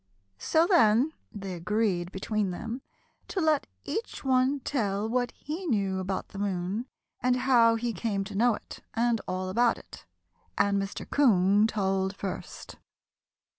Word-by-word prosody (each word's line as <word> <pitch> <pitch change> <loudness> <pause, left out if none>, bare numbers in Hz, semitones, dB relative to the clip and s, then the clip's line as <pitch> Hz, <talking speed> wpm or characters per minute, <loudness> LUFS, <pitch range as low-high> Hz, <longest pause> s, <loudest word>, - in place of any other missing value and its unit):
So 320 +1 +3
then 290 - +4 0.2
they 195 -2 -6
agreed 180 0 0
between 205 +1 -1
them 230 +8 -5 0.5
to 385 - -3
let 310 -4 +2 0.2
each 450 - -4
one 260 +1 +2
tell 210 -6 -1
what 245 +1 0
he 330 +5 -6
knew 195 -7 +1
about 185 +1 -3
the 195 - -8
moon 200 +4 -2 0.3
and 250 0 +3
how 240 -3 +4
he 235 +1 -2
came 200 0 -1
to 195 - -8
know 235 +2 +4
it - - -11 0.2
and 235 -1 +2
all 185 0 -2
about 235 +5 +2
it. - - -13 0.5
And 200 0 +2
Mr. 195 0 -5
'Coon 205 -6 +4
told 195 -2 0
first. 195 -1 -6
215 Hz, 145 wpm, -28 LUFS, 195-250 Hz, 0.5 s, then